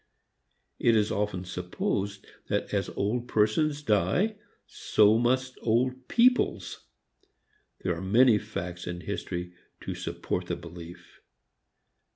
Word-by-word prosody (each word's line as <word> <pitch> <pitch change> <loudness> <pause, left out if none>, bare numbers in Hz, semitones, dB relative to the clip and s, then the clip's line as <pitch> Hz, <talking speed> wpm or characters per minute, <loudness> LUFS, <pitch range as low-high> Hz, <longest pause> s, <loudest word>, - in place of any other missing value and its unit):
It 115 - +4
is 105 -1 +2
often 100 -3 -2
supposed 95 +3 -3 0.2
that - - -2
as - - 0
old 120 +5 -2
persons 145 +8 +1
die, 110 - +2 0.3
so 110 +1 +3
must 130 +2 0
old 125 +3 0
peoples. 250 +1 +2 1.0
There 90 -2 0
are 85 - -6
many 110 +4 +5
facts 90 -5 -6
in 90 0 -4
history 90 -3 -4 0.3
to - - -4
support - - -4
the - - -1
belief. 85 0 -11
105 Hz, 115 wpm, -28 LUFS, 90-125 Hz, 1.0 s, many